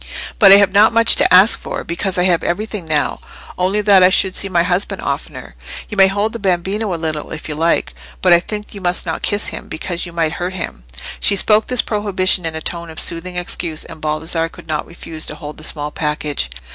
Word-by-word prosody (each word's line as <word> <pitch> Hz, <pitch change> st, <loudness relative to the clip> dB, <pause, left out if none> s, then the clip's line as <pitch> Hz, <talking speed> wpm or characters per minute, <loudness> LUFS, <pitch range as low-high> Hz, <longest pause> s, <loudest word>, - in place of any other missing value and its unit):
But 195 Hz, -3 st, +8 dB
I -, -, +11 dB
have 200 Hz, -1 st, +4 dB
not 210 Hz, +3 st, +5 dB
much 230 Hz, 0 st, +5 dB
to -, -, +3 dB
ask 190 Hz, +5 st, +6 dB
for, -, -, -6 dB
because 185 Hz, +3 st, -3 dB
I 180 Hz, -, +2 dB
have 180 Hz, -2 st, +2 dB
everything 210 Hz, 0 st, -3 dB
now—only 180 Hz, +5 st, -2 dB
that 200 Hz, -2 st, +5 dB
I 180 Hz, -, +7 dB
should 190 Hz, 0 st, +3 dB
see 195 Hz, -, 0 dB
my 170 Hz, -2 st, +2 dB
husband 180 Hz, +2 st, 0 dB
oftener. -, -, -5 dB, 0.4 s
You 210 Hz, -, -6 dB
may 195 Hz, -1 st, +6 dB
hold 205 Hz, +3 st, -1 dB
the 230 Hz, -, -5 dB
bambino 195 Hz, +2 st, -1 dB
a -, -, -1 dB
little 155 Hz, -2 st, -4 dB
if 155 Hz, -, -7 dB
you 155 Hz, -, -4 dB
like, 160 Hz, -, 0 dB, 0.3 s
but -, -, +4 dB
I 170 Hz, -, +6 dB
think 210 Hz, +3 st, -7 dB
you 200 Hz, -, -9 dB
must 180 Hz, 0 st, +2 dB
not 160 Hz, -2 st, -4 dB
kiss 205 Hz, 0 st, 0 dB
him, -, -, -8 dB
because 170 Hz, +2 st, -5 dB
you -, -, -9 dB
might 165 Hz, -2 st, -1 dB
hurt 180 Hz, +2 st, -4 dB
him." 170 Hz, -, -7 dB, 0.3 s
She 200 Hz, -, +4 dB
spoke 210 Hz, +2 st, +3 dB
this 250 Hz, -1 st, 0 dB
prohibition 190 Hz, -4 st, 0 dB
in 160 Hz, -, -5 dB
a 160 Hz, -, -5 dB
tone 170 Hz, +1 st, -4 dB
of 160 Hz, -, -4 dB
soothing 175 Hz, +2 st, -1 dB
excuse, 175 Hz, -2 st, -4 dB
and 160 Hz, -, -12 dB
Baldassarre 160 Hz, +2 st, -1 dB
could -, -, -14 dB
not 155 Hz, -2 st, -3 dB
refuse 165 Hz, -2 st, -7 dB
to -, -, -5 dB
hold 150 Hz, -1 st, -9 dB
the -, -, -8 dB
small 150 Hz, -1 st, -3 dB
package. 150 Hz, -, -2 dB
180 Hz, 225 wpm, -17 LUFS, 160-200 Hz, 0.4 s, I